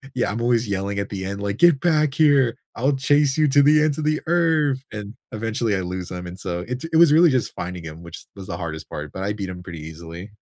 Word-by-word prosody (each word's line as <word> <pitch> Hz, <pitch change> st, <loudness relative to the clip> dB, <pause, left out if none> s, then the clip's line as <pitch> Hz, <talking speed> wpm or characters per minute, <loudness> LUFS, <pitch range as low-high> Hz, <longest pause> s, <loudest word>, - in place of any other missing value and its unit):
Yeah, 120 Hz, -4 st, 0 dB
I'm 115 Hz, -, -3 dB
always 120 Hz, -1 st, +1 dB
yelling 100 Hz, 0 st, -2 dB
at 100 Hz, -, -2 dB
the 95 Hz, -2 st, -5 dB
end, 100 Hz, +1 st, -5 dB
like," 100 Hz, 0 st, -2 dB
Get 170 Hz, -3 st, +5 dB
back 155 Hz, -4 st, +2 dB
here, 140 Hz, -6 st, +3 dB, 0.2 s
I'll 135 Hz, +4 st, +1 dB
chase 145 Hz, +1 st, +2 dB
you 155 Hz, -, +4 dB
to 145 Hz, +1 st, +5 dB
the 150 Hz, +1 st, +5 dB
ends 155 Hz, -2 st, +1 dB
of 155 Hz, -, -3 dB
the 155 Hz, 0 st, +1 dB
Earth," 160 Hz, -5 st, +2 dB
and 105 Hz, -1 st, -7 dB, 0.2 s
eventually, 115 Hz, 0 st, -1 dB
I 95 Hz, -, -2 dB
lose 90 Hz, 0 st, -5 dB
him, 90 Hz, 0 st, -6 dB
and 90 Hz, +2 st, -8 dB
so 90 Hz, -2 st, -4 dB
it 125 Hz, 0 st, -4 dB
it -, -, +4 dB
was 165 Hz, -3 st, +7 dB
really 165 Hz, +1 st, +6 dB
just 130 Hz, -3 st, 0 dB
finding 90 Hz, 0 st, -5 dB
him, 80 Hz, +1 st, -9 dB
which 85 Hz, -1 st, -10 dB
was 95 Hz, -2 st, -10 dB
the -, -, -4 dB
hardest 80 Hz, -2 st, -6 dB
part, 75 Hz, -1 st, -6 dB
but 95 Hz, -, -5 dB
I 100 Hz, -, -1 dB
beat 100 Hz, -2 st, -5 dB
him 90 Hz, -1 st, -8 dB
pretty 85 Hz, -3 st, -8 dB
easily. 85 Hz, +5 st, -9 dB
110 Hz, 260 wpm, -22 LUFS, 90-145 Hz, 0.2 s, was